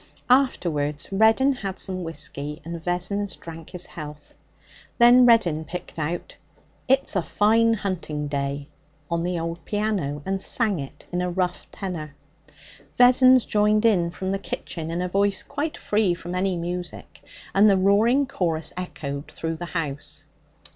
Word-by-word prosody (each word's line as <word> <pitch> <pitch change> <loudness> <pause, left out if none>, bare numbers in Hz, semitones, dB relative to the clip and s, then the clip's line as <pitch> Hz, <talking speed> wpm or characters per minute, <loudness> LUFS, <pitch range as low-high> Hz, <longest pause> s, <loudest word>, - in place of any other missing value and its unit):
Afterwards 155 - +1
Reddin 220 +7 +4
had 195 -7 -5
some 185 -1 -3
whisky, 150 -2 -4
and 170 0 -6
Vessons 180 +3 -1
drank 165 -1 -10
his 180 -1 -2
health. 150 -2 -9 0.6
Then 245 +1 +7
Reddin 175 -10 +4
picked 170 +1 -7
out 165 +3 -4 0.5
'It's 265 -3 +3
a 190 - +3
Fine 225 +5 +3
Hunting 170 -8 -3
Day' 140 0 -3 0.4
on 170 0 +1
the 175 0 -1
old 165 +1 -4
piano, 200 -10 -2
and 195 0 -1
sang 210 -6 +1
it 135 -1 -9
in 180 0 -1
a 180 - -1
rough 180 0 -2
tenor. 160 -7 -6 0.8
Vessons 255 0 +6
joined 210 +1 +2
in 180 -7 +3
from 190 +2 -4
the 195 - -1
kitchen 165 -4 -5
in 170 +2 -2
a - - -1
voice 200 +1 +1
quite 295 +2 -4
free 205 -4 +1
from 175 +1 -7
any 185 0 0
music, 175 +1 -6 0.3
and 205 +2 +6
the 195 - +4
roaring 215 +8 +4
chorus 170 - -2
echoed 145 -5 -5
through 165 0 -4
the 175 - -5
house. 145 -3 -4
180 Hz, 150 wpm, -24 LUFS, 165-210 Hz, 0.8 s, Then